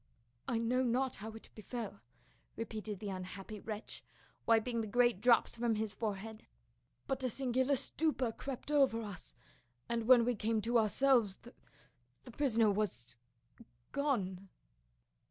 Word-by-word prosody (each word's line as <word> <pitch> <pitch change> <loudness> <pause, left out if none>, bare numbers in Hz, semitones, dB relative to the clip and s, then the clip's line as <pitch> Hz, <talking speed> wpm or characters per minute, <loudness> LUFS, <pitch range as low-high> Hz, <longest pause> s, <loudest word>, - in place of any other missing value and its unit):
"I 235 - 0
know 235 +3 +1
not 255 +1 +1
how 215 +3 -6
it 225 - -12
befell," 220 - -6 0.6
repeated 215 -2 -5
the 205 - -4
unhappy 190 +3 -7
wretch, 215 +1 -6 0.4
wiping 230 +1 +3
the 220 - -4
great 240 -2 +3
drops 245 -1 +4
from 235 -1 +1
his 215 -1 -2
forehead, 215 +1 -5 0.3
" 120 +2 -44
but 270 -1 -1
a 255 - +1
singular 260 +2 +1
stupor 270 -2 0
crept 270 +4 -6
over 270 -6 +3
us, 200 -4 -8 0.5
and 230 -1 -1
when 245 -2 +7
we 245 - +2
came 220 0 0
to 235 +2 +3
ourselves 225 -2 +3
the 240 +5 -15 0.4
— - - -41
the 245 - -11
prisoner 230 -5 +3
was 125 - -2 0.3
— 120 0 -23
gone." 195 -10 -1
225 Hz, 150 wpm, -35 LUFS, 210-250 Hz, 0.6 s, when